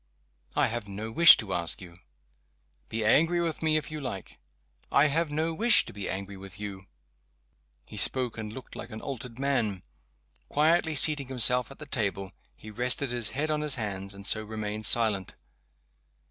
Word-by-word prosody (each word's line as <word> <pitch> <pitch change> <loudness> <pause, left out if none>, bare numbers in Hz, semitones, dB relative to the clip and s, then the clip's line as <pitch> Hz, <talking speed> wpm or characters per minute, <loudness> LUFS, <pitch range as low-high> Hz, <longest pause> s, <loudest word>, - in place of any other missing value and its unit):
"I - - +4
have 115 -2 -3
no 105 +3 -7
wish 170 +7 +8
to 100 -4 -5
ask 85 -2 -1
you." 90 -2 -12 0.9
"Be 110 -1 -2
angry 165 +10 +3
with 165 -2 -3
me, 155 -1 +2
if 155 - -5
you 155 -1 -6
like!" 100 -8 -7 0.5
"I 140 - +5
have 160 +2 +1
no 160 +2 -2
wish 230 +8 +4
to - - -10
be 100 -1 -6
angry 100 +1 -5
with 95 0 -11
you." 95 -2 -8 1.0
He - - -11
spoke 125 -3 +3
and 110 -1 -7
looked 130 +4 -11
like 115 - -8
an 110 -2 -8
altered 125 -3 -7
man. 120 -9 -1 0.7
Quietly 160 +1 +2
seating 145 -1 +4
himself 125 -1 +1
at 135 - -13
the 150 - -9
table, 100 -7 -2 0.2
he 110 - -12
rested 125 +3 0
his 120 -4 +1
head 155 +2 -1
on 150 0 -1
his 150 -2 +3
hand 100 -4 -4
and 100 0 -10
so 110 +2 +2
remained 110 0 -3
silent. 105 -5 +3
115 Hz, 175 wpm, -27 LUFS, 100-145 Hz, 1.0 s, wish